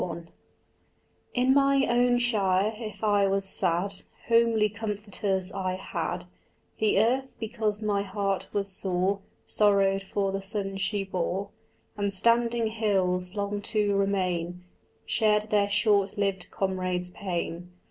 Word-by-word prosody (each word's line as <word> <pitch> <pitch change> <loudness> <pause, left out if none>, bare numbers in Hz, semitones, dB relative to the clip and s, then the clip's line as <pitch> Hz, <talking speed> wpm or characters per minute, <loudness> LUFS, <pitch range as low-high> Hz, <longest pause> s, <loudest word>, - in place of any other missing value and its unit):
XLI 170 -1 -4 1.1
In 255 +1 +4
my 275 0 +4
own 245 +1 +3
shire, 210 -4 +1
if 215 -2 -8
I 205 -2 +3
was 195 0 +3
sad 185 +1 +2 0.4
Homely 230 -2 +4
comforters 205 -3 -2
I 185 -2 -2
had: 175 -1 -4 0.5
The 215 -2 +2
earth, 260 +5 +1
because 220 -2 -2
my 205 -1 +1
heart 195 -1 -2
was 200 -1 -1
sore, 190 0 0 0.3
Sorrowed 195 -2 +3
for 195 0 -2
the 195 0 -3
son 195 -1 -3
she 195 +1 -1
bore; 190 +1 -3 0.5
And 200 -1 0
standing 235 +3 +3
hills, 190 -4 0
long 205 0 -2
to 205 -1 +1
remain, 180 -3 -1 0.4
Shared 215 -1 +1
their 205 -1 +3
short 205 -1 +2
lived 195 -3 -1
comrade's 185 -2 -2
pain. 175 -2 -4
200 Hz, 125 wpm, -27 LUFS, 190-215 Hz, 1.1 s, In